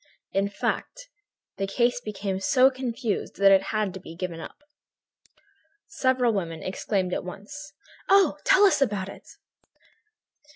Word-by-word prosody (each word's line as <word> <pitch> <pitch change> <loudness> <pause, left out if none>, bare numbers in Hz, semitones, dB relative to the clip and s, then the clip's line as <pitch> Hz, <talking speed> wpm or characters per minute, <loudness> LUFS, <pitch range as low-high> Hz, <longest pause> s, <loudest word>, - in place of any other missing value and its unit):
In 195 +1 0
fact, - - -4 0.5
the 195 - -2
case 245 +4 +1
became 200 -3 -4
so 255 +6 +4
confused 240 -4 -3
that 195 0 +5
it 195 0 +5
had 215 -3 -1
to 190 - -7
be 165 -2 -11
given 170 -1 -5
up." 290 - -10 1.2
Several 255 -3 +1
women 165 -5 -3
exclaimed 185 -1 -2
at - - -2
once: 195 +1 -9 0.4
"Oh! 380 -7 +4
Tell 385 - +5
us 380 -7 +3
about 200 -7 0
it!" - - -12
200 Hz, 135 wpm, -26 LUFS, 190-255 Hz, 1.2 s, that